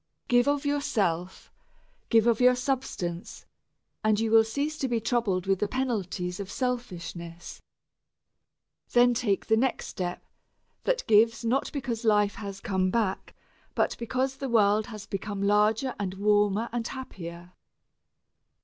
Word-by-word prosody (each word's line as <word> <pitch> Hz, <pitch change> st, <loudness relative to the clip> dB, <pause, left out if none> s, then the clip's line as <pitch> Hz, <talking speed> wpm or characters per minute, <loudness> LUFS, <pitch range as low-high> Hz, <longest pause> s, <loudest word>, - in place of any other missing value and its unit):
Give 245 Hz, +2 st, +4 dB
of 285 Hz, 0 st, +1 dB
yourself, 200 Hz, -, -1 dB, 0.6 s
give 225 Hz, -2 st, +4 dB
of 235 Hz, 0 st, +3 dB
your 250 Hz, 0 st, +6 dB
substance, 245 Hz, -10 st, -3 dB, 0.6 s
and 215 Hz, -1 st, +3 dB
you 225 Hz, -1 st, 0 dB
will 225 Hz, 0 st, +7 dB
cease 285 Hz, +7 st, -3 dB
to 265 Hz, -, 0 dB
be 240 Hz, -2 st, 0 dB
troubled 225 Hz, -6 st, 0 dB
with 195 Hz, -1 st, +1 dB
the 210 Hz, -, 0 dB
penalties 200 Hz, -8 st, -2 dB
of 195 Hz, -1 st, -6 dB
selfishness. 175 Hz, -10 st, -5 dB, 1.3 s
Then 245 Hz, 0 st, +5 dB
take 220 Hz, -5 st, 0 dB
the 220 Hz, -, +3 dB
next 255 Hz, +3 st, 0 dB
step 175 Hz, -1 st, -4 dB, 0.6 s
that -, -, 0 dB
gives 225 Hz, +2 st, +4 dB
not 255 Hz, +4 st, 0 dB
because 245 Hz, -5 st, -3 dB
life 210 Hz, -2 st, +3 dB
has 200 Hz, -1 st, -6 dB
come 190 Hz, -5 st, 0 dB
back, 200 Hz, -2 st, -1 dB, 0.4 s
but -, -, +1 dB
because 260 Hz, +3 st, -1 dB
the 275 Hz, -1 st, -4 dB
world 215 Hz, -1 st, +3 dB
has 215 Hz, -3 st, -8 dB
become 200 Hz, 0 st, -4 dB
larger 210 Hz, +5 st, +2 dB
and 190 Hz, -2 st, -3 dB
warmer 205 Hz, +2 st, +2 dB
and 235 Hz, 0 st, -2 dB
happier. 175 Hz, -9 st, -8 dB
220 Hz, 140 wpm, -27 LUFS, 195-245 Hz, 1.3 s, will